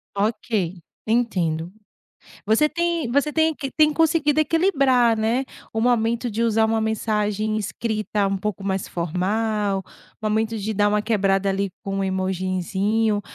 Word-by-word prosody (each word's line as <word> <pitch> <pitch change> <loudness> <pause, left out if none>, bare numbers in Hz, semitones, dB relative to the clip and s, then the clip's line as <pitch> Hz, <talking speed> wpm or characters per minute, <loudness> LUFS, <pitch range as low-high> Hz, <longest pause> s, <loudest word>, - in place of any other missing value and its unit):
Ok, 205 -3 -1 0.3
entendo. 180 -8 0 0.7
Você 225 +8 +4
tem 340 -5 -1
você 285 +3 +2
tem 320 0 +3
que 275 -2 -5
tem 305 0 +4
conseguido 310 -2 +2
equilibrar, 275 - +3
né, 230 +5 +1 0.3
o 225 - -1
momento 235 0 +1
de 225 +3 -2
usar 225 -1 +3
uma 225 0 +1
mensagem 215 -1 -1
escrita 215 -1 -2
um 195 0 -1
pouco 200 0 -4
mais 190 -1 -2
formal, 195 +3 -1 0.4
o - - -5
momento 220 +1 0
de 215 +2 -3
dar 205 +1 +2
uma 210 0 +1
quebrada 195 -3 +1
ali 195 0 -1
com 195 0 -4
um 195 - 0
emojizinho, 190 +3 0
215 Hz, 145 wpm, -23 LUFS, 195-240 Hz, 0.7 s, Você